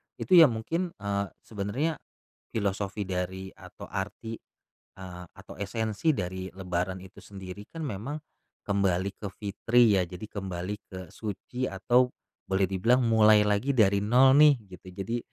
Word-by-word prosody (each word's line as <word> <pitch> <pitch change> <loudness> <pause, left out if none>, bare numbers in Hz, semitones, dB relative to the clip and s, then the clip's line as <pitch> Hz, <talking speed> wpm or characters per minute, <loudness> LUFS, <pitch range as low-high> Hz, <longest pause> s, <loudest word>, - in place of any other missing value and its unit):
itu - - -8
ya 160 - +10
mungkin, 165 +10 -3
eee, 100 0 -2 0.2
sebenernya 115 +10 -2 0.6
filosofi 100 -1 -1
dari 95 0 -4
atau - - -13
arti, 105 +3 -5 0.6
eee, 90 -1 -9
atau - - -13
esensi 110 +8 0
dari 95 -1 -4
lebaran 90 0 -3
itu 95 - -14
sendiri 95 0 -10
kan 165 -1 -6
memang 130 +2 -4 0.5
kembali 100 -1 +1
ke 105 - -4
fitri 110 +1 +3
ya, - - +2
jadi 90 +3 -9
kembali 95 -1 -4
ke 95 -2 -8
suci, 115 +4 -4
atau 125 +6 +2 0.4
boleh 95 0 +1
dibilang 115 +7 +2
mulai 110 -2 +6
lagi 105 +7 +1
dari 100 -4 +4
nol 130 +5 +6
nih 150 -1 +8 0.2
gitu, 90 - -18 0.2
jadi 115 +5 -2
100 Hz, 140 wpm, -28 LUFS, 95-115 Hz, 0.6 s, ya